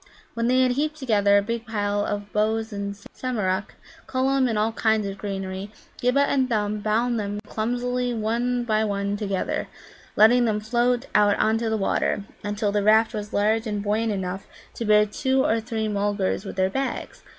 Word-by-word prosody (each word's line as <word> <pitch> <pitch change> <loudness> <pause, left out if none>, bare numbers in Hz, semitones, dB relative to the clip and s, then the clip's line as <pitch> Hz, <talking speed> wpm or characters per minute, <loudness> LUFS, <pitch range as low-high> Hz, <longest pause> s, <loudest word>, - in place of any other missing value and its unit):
When 230 0 -1
they 255 +1 +4
had 255 -1 +3
heaped 300 +4 -1
together 205 -7 +3
a 200 - +2
big 230 +2 -4
pile 205 -2 -1
of 205 0 -4
boughs 220 +1 0
and 200 0 -4 0.2
Samarak, 210 -6 -2 0.3
Cullum 265 0 +1
and 225 -3 -1
all 215 +2 +1
kinds 220 -2 +1
of 195 0 -5
greenery, 195 0 -5 0.3
Ghibba 250 +3 +3
and 270 -2 +2
Thumb 210 -2 0
bound 225 +3 0
them 205 0 -3
clumsily 245 +2 -1
one 240 +2 -1
by 220 -2 +1
one 200 -1 -1
together, 200 -2 -2 0.5
letting 240 +3 +6
them 215 -2 +1
float 240 +3 +1
out 205 -1 +4
on 220 +1 +2
to 230 -1 -1
the 220 - 0
water, 200 0 0 0.2
until 205 0 -1
the 205 0 +1
raft 220 +2 +4
was 210 -1 -5
large 220 +3 +1
and 205 -1 -2
buoyant 215 +2 0
enough 190 -1 -4 0.3
to 230 - -4
bear 210 0 +5
two 265 +5 0
or 225 - +2
three 220 -1 -3
Mulgars 205 -2 -1
with - - -6
their 190 0 +1
bags. 270 +3 -3
215 Hz, 185 wpm, -24 LUFS, 205-240 Hz, 0.5 s, letting